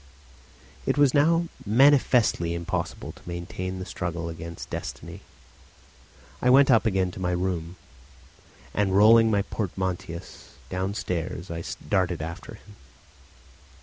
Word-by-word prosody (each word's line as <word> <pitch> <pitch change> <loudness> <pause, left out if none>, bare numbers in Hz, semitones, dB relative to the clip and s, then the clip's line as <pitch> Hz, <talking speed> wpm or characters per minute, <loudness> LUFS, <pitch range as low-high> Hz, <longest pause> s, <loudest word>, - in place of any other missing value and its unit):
It - - +1
was 145 -3 +4
now 165 +4 +3 0.2
manifestly 120 -7 +3
impossible 85 0 -4
to - - -14
maintain 90 +2 -5
the 95 - -5
struggle 85 -2 -4
against 85 0 -8
destiny. - - -6 1.2
I 125 - +3
went 135 +1 +6
up 115 -1 +4
again 95 -3 +1
to - - -10
my 90 -1 -1
room, 90 -1 -2 1.0
and 95 -2 +1
rolling 115 +2 +7
my 100 -2 +2
portmanteaus 95 -3 -5 0.2
downstairs 90 -2 -3
I 85 0 -4 0.2
darted 90 -1 +1
after 80 +2 -7
him. 105 -1 -17
95 Hz, 115 wpm, -26 LUFS, 85-110 Hz, 1.2 s, rolling